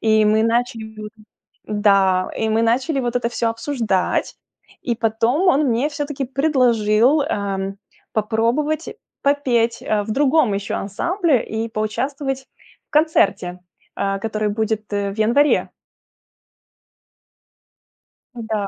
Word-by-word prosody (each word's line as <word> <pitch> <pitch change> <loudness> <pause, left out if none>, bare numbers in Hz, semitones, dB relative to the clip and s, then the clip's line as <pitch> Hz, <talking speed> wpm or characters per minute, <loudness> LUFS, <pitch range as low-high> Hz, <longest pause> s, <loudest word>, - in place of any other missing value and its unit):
И 220 -1 +3
мы 215 +1 +3
начали, 230 -1 -1 0.7
да, 195 -3 +2
и 220 - -1
мы 220 +1 +2
начали 265 +6 +1
вот 245 -1 -1
это 245 -1 0
всё 235 -1 -1
обсуждать. 225 -6 -1 0.5
И 240 - -1
потом 230 - +1
он 295 -2 +3
мне 245 +3 +1
всё-таки 290 -2 -4
предложил, 255 -2 +2
эм, 195 -8 -3 0.4
попробовать 235 +9 0 0.3
попеть, 245 -5 +1
э, 210 -1 0
в 220 - -6
другом 275 -4 +3
ещё 200 0 -3
ансамбле 320 - 0
и 220 +1 -3
поучаствовать 265 +5 -3 0.4
в - - -67
концерте, 250 - +2 0.4
э, 195 0 -1
который 215 0 -1
будет 220 +1 -1
в 200 -1 -2
январе. 240 +7 +3 2.7
Н-да. 220 -3 -3
230 Hz, 110 wpm, -20 LUFS, 215-270 Hz, 2.7 s, И